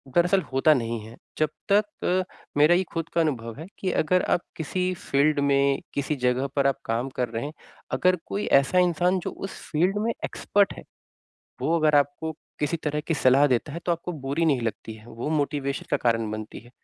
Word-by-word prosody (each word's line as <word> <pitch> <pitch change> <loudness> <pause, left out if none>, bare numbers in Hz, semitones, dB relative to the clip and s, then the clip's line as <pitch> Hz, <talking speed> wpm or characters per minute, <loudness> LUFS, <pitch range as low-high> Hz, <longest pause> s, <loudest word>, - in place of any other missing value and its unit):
दरअसल 180 +3 +4
होता 135 +4 +5
नहीं 115 -4 -2
है 115 +1 -11 0.2
जबतक 200 +7 0
अ, 185 +1 +2 0.3
मेरा 150 +4 +6
ये 185 - +2
खुद 165 -1 -2
का 170 - +3
अनुभव 115 -8 -2
है 160 - -6
कि 190 - -1
अगर 180 +3 +2
आप - - +1 0.2
किसी 180 +4 -1
फ़ील्ड 145 -2 +1
में 140 -1 +3
किसी 140 +2 -1
जगह 125 +2 +2
पर 140 -1 +3
आप 135 - +1
काम 115 +4 -1
कर 125 -2 0
रहे 115 +3 -3
हैं, 150 - -5 0.4
अगर 185 0 +3
कोई 205 - -3
ऐसा 140 +7 +1
इंसान 180 +1 +2
जो - - -4
उस 195 - -7
फ़ील्ड 180 +6 +2
में 230 - +2
एक्सपर्ट 200 -1 +1
है, - - -11 0.8
वो 165 - +2
अगर 155 -1 +3
आपको 145 +3 0 0.3
किसी 150 +3 0
तरह 150 0 0
की 165 +2 -2
सलाह 135 0 +5
देता 130 +2 0
है 165 - -4
तो 175 - +3
आपको 170 +1 -4
बुरी 145 +5 0
नहीं 145 -6 +2
लगती 110 -1 -4
है, 110 0 -15
वो 120 +4 -5
मोटिवेशन 145 -2 -1
का - - +3
कारण 115 -2 0
बनती 110 0 -6
है। 120 +2 -18
150 Hz, 205 wpm, -25 LUFS, 130-175 Hz, 0.8 s, मेरा